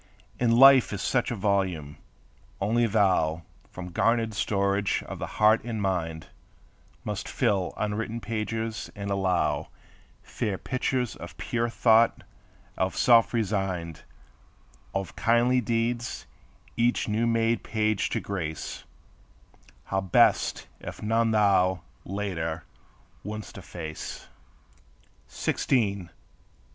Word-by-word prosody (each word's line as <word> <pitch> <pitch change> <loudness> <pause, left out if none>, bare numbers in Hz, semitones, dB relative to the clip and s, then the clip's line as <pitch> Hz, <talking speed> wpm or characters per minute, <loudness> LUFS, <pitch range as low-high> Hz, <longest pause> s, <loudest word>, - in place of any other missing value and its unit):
And 115 -1 +3
life 135 -1 +8
is 105 - -3
such 125 - +1
a 120 - -2
volume, 95 -7 -1 0.6
only 115 +4 +2
thou, 90 -7 +2 0.3
From 90 -1 -8
garnered 115 +4 +1
storage 100 0 0
of - - -7
the - - -3
heart 110 +1 +5
and 115 -2 -4
mind, 85 -5 -2 0.8
Must - - -4
fill 95 -3 0
unwritten 110 +2 -2
pages, 110 0 -3
and 100 -1 -4
allow 95 -2 0 0.5
Fair 100 -3 -3
pictures 130 0 -2
of 85 -3 -10
pure 120 -1 -1
thought, 115 0 +3 0.6
of 95 0 0
self 115 -2 +5
resigned, 95 -7 -2 0.9
Of 95 -3 -4
kindly 120 +2 +3
deeds 120 +1 -2 0.5
each 120 +1 +1
new 110 +2 +1
made 115 0 +1
page 110 -2 0
to - - -1
grace; 85 -6 -5 1.0
How 95 0 -1
blest 95 -2 +3
if - - -8
none 115 +1 +2
thou, 100 -4 +3 0.2
later, 85 -5 -3 0.6
woulds't 110 +3 -7
efface! 85 -5 -7 1.0
Sixteen! 100 -8 0
105 Hz, 110 wpm, -27 LUFS, 95-115 Hz, 1.0 s, life